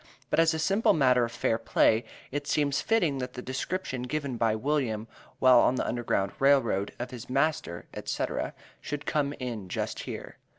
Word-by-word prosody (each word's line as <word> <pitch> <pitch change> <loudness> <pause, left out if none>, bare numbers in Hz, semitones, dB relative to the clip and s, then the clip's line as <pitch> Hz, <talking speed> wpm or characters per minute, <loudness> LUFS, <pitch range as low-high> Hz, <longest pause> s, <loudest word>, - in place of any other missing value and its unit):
But - - +3
as 165 0 +4
a - - -1
simple 195 +8 +3
matter 125 -5 +4
of 115 - -7
fair 115 -1 0
play, 115 0 +3 0.3
it 145 +1 -3
seems 140 -2 +1
fitting, 175 -12 +1
that 125 0 -4
the 125 - -6
description 130 +1 -3
given 140 0 -3
by 115 -2 +2
William, 115 -4 -1 0.3
while 130 -2 +7
on 125 - +4
the - - -1
Underground 115 -5 0
Rail 140 0 +6
Road, 100 -5 -2
of 120 - -5
his 125 -2 -9
master, 135 - 0 0.2
&c., - - -1 0.5
should 145 +1 -5
come 145 -2 0
in 115 -8 -5
just - - -3
here. - - -7
130 Hz, 180 wpm, -28 LUFS, 115-145 Hz, 0.5 s, while